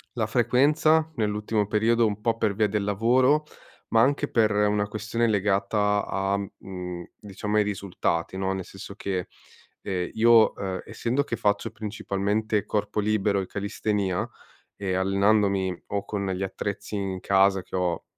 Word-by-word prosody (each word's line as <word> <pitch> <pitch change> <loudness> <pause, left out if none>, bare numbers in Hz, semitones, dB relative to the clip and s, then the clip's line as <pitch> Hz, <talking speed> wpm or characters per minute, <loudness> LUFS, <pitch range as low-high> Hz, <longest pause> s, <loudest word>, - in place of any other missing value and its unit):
la 115 - 0
frequenza 150 +7 +3
nell'ultimo 105 0 0
periodo, 115 +2 +3
un 105 -1 -3
po' 115 +1 +1
per 105 -3 0
via 110 0 +2
del 105 0 -1
lavoro, 125 +9 +3 0.4
ma 115 - +4
anche 140 +3 +2
per 110 -2 +2
una 105 0 +2
questione 110 +3 -1
legata 105 0 +1
a 95 0 -1
mhmm, 90 -3 -7 0.2
diciamo 105 +1 -3
ai 105 - +5
risultati, 95 -4 -2
no, 95 0 -1
nel 95 -2 -4
senso 95 +1 -10
che, 95 -3 -3 0.5
ehm, 90 -2 -2
io, 115 0 +5
uhm, 95 -1 -4
essendo 130 +5 -1
che 120 - -3
faccio 105 -2 0
principalmente 105 0 -2
corpo 105 0 -1
libero 105 -1 +1
e 95 - -2
callistenìa, 100 -2 -2 0.5
ehm, 95 -2 -1
allenandomi 100 -1 +2
o 100 0 -2
con 100 -2 -3
gli 95 +1 -3
attrezzi 100 +2 -4
in 95 -2 -3
casa 95 -1 +3
che - - -15
ho 90 -2 -1
105 Hz, 150 wpm, -26 LUFS, 95-110 Hz, 0.5 s, ai